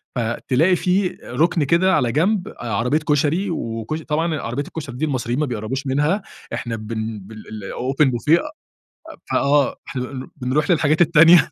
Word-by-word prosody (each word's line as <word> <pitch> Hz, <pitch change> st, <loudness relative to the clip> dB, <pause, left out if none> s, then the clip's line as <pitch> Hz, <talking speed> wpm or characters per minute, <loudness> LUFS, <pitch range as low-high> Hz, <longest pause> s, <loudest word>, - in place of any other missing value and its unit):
فتلاقي 125 Hz, +8 st, +1 dB
في 180 Hz, +1 st, +1 dB
رُكن 165 Hz, 0 st, +1 dB
كده 185 Hz, +6 st, +3 dB
على 120 Hz, -2 st, +1 dB
جنب 185 Hz, -, +1 dB
عربيّة 120 Hz, +6 st, 0 dB
كشري 150 Hz, +6 st, +1 dB
وكشر 115 Hz, +1 st, -4 dB
طبعًا 160 Hz, +1 st, 0 dB
عربية 125 Hz, +5 st, -3 dB
الكشري 140 Hz, -5 st, -7 dB
دي 155 Hz, +5 st, -1 dB
المصريين 130 Hz, -2 st, -1 dB
ما 150 Hz, -, +2 dB
بيقربوش 125 Hz, +3 st, -4 dB
منها، 150 Hz, +9 st, +1 dB, 0.3 s
إحنا 115 Hz, -2 st, -3 dB
بن 110 Hz, 0 st, -4 dB
بال 110 Hz, +3 st, -12 dB
الأوبن 130 Hz, +7 st, -1 dB
بوفيه 150 Hz, +8 st, +3 dB, 0.9 s
فآه، 140 Hz, -1 st, +2 dB
إحنا 125 Hz, -2 st, -3 dB
بن 130 Hz, 0 st, -6 dB
بنرُوح 140 Hz, +4 st, 0 dB
للحاجات 155 Hz, -1 st, +3 dB
التانية. 165 Hz, +1 st, +6 dB
145 Hz, 145 wpm, -21 LUFS, 120-165 Hz, 0.9 s, التانية